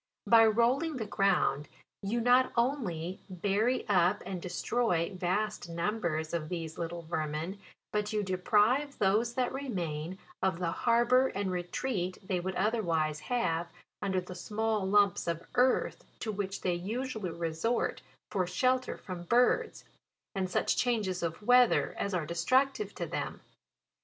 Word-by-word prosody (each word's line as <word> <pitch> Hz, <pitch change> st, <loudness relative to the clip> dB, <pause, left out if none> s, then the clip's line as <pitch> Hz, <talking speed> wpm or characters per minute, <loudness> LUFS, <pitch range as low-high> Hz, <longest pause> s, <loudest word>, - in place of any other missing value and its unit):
By 225 Hz, -1 st, +7 dB
rolling 255 Hz, +8 st, +2 dB
the 220 Hz, -, -3 dB
ground, 190 Hz, -8 st, +1 dB, 0.3 s
you 220 Hz, +4 st, -1 dB
not 250 Hz, +2 st, +4 dB
only 195 Hz, -, -1 dB
bury 205 Hz, +7 st, 0 dB
up 185 Hz, 0 st, +3 dB
and 185 Hz, -2 st, -4 dB
destroy 180 Hz, -1 st, 0 dB
vast 185 Hz, +1 st, -1 dB
numbers 170 Hz, -3 st, -2 dB
of 155 Hz, -2 st, -2 dB
these 165 Hz, -3 st, -5 dB
little 170 Hz, 0 st, -4 dB
vermin, 160 Hz, +3 st, -3 dB, 0.3 s
but 210 Hz, 0 st, -1 dB
you 210 Hz, -1 st, 0 dB
deprive 210 Hz, +9 st, +2 dB
those 215 Hz, +5 st, +2 dB
that 255 Hz, -1 st, 0 dB
remain 180 Hz, -, -3 dB, 0.2 s
of 190 Hz, -2 st, +1 dB
the 170 Hz, -1 st, -1 dB
harbour 240 Hz, +5 st, +3 dB
and 195 Hz, -4 st, -2 dB
retreat 185 Hz, +1 st, -2 dB
they 185 Hz, -2 st, 0 dB
would 185 Hz, +2 st, -3 dB
otherwise 170 Hz, -8 st, 0 dB
have, 170 Hz, -9 st, -1 dB, 0.3 s
under 190 Hz, -1 st, 0 dB
the 180 Hz, 0 st, -7 dB
small 215 Hz, +2 st, -1 dB
lumps 200 Hz, -2 st, +3 dB
of 170 Hz, 0 st, -2 dB
earth, 250 Hz, +1 st, +2 dB, 0.2 s
to 220 Hz, -, -2 dB
which 200 Hz, -1 st, -4 dB
they 180 Hz, -, +1 dB
usually 220 Hz, +3 st, -3 dB
resort 170 Hz, +8 st, -1 dB, 0.3 s
for 185 Hz, -3 st, 0 dB
shelter 255 Hz, +8 st, +1 dB
from 180 Hz, -2 st, -7 dB
birds, 240 Hz, +6 st, +2 dB, 0.5 s
and 190 Hz, -2 st, -1 dB
such -, -, +1 dB
changes 210 Hz, -7 st, 0 dB
of 170 Hz, +4 st, -3 dB
weather 245 Hz, +1 st, +4 dB
as 200 Hz, -1 st, -1 dB
are 170 Hz, -3 st, -1 dB
destructive 260 Hz, -, +1 dB
to -, -, -3 dB
them. -, -, -4 dB
195 Hz, 140 wpm, -31 LUFS, 175-235 Hz, 0.5 s, By